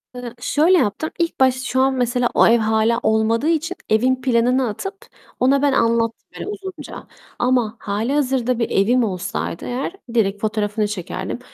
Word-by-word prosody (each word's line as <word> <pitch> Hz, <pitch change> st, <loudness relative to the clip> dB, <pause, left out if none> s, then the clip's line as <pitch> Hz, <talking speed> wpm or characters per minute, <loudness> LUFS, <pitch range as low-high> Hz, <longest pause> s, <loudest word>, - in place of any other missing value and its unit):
Hı, 245 Hz, -2 st, -7 dB
şöyle 325 Hz, +8 st, +3 dB
yaptım, 315 Hz, +6 st, 0 dB
ilk 335 Hz, -4 st, -1 dB
baş 260 Hz, -1 st, +4 dB
şu 260 Hz, -1 st, 0 dB
an 265 Hz, 0 st, +3 dB
mesela 245 Hz, 0 st, +1 dB
o -, -, +5 dB
ev 235 Hz, +1 st, +5 dB
hâlâ 220 Hz, +2 st, +2 dB
olmadığı 220 Hz, +5 st, +2 dB
için 330 Hz, +3 st, -1 dB
evin 255 Hz, +4 st, +2 dB
planını 250 Hz, 0 st, +2 dB
atıp 390 Hz, -, -7 dB, 0.3 s
ona 270 Hz, +2 st, +3 dB
ben 285 Hz, -1 st, +3 dB
anlattım 230 Hz, -1 st, +1 dB
böyle -, -, -6 dB
uzunca. 380 Hz, -7 st, -8 dB, 0.3 s
Ama 245 Hz, -3 st, +1 dB
hâlihazırda 250 Hz, +3 st, 0 dB
bir 230 Hz, -, 0 dB
evim 235 Hz, +5 st, +2 dB
olsaydı 185 Hz, -4 st, -3 dB
eğer 260 Hz, +8 st, -3 dB, 0.2 s
direkt 205 Hz, -3 st, +1 dB
fotoğrafını 210 Hz, -1 st, -1 dB
çekerdim. 205 Hz, +3 st, -5 dB
245 Hz, 155 wpm, -20 LUFS, 220-270 Hz, 0.3 s, o